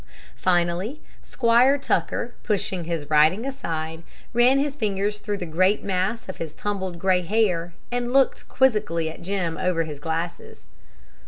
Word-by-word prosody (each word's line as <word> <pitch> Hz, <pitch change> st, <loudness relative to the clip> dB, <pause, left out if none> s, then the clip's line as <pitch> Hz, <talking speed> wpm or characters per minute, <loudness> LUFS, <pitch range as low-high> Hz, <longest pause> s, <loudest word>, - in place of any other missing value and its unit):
Finally, 180 Hz, -, 0 dB, 0.2 s
Squire 245 Hz, +3 st, +3 dB
Tucker, 245 Hz, -3 st, -1 dB
pushing 190 Hz, -4 st, -2 dB
his 165 Hz, -3 st, -3 dB
writing 155 Hz, +9 st, +4 dB
aside, 160 Hz, -, -4 dB, 0.3 s
ran 245 Hz, +3 st, +5 dB
his 280 Hz, 0 st, 0 dB
fingers 210 Hz, -4 st, -1 dB
through 205 Hz, 0 st, -3 dB
the 180 Hz, -, -4 dB
great 185 Hz, +5 st, +2 dB
mass 195 Hz, +4 st, -1 dB
of 185 Hz, -, -6 dB
his 160 Hz, -2 st, -6 dB
tumbled 190 Hz, -2 st, -3 dB
gray 185 Hz, +1 st, +2 dB
hair, 175 Hz, -3 st, 0 dB, 0.2 s
and 245 Hz, 0 st, -1 dB
looked 270 Hz, 0 st, +2 dB
quizzically 210 Hz, -11 st, +1 dB
at 160 Hz, -, -12 dB
Jim 175 Hz, -3 st, -2 dB
over 180 Hz, -3 st, +1 dB
his 150 Hz, -3 st, -7 dB
glasses. 165 Hz, +2 st, -4 dB
190 Hz, 145 wpm, -24 LUFS, 170-230 Hz, 0.3 s, ran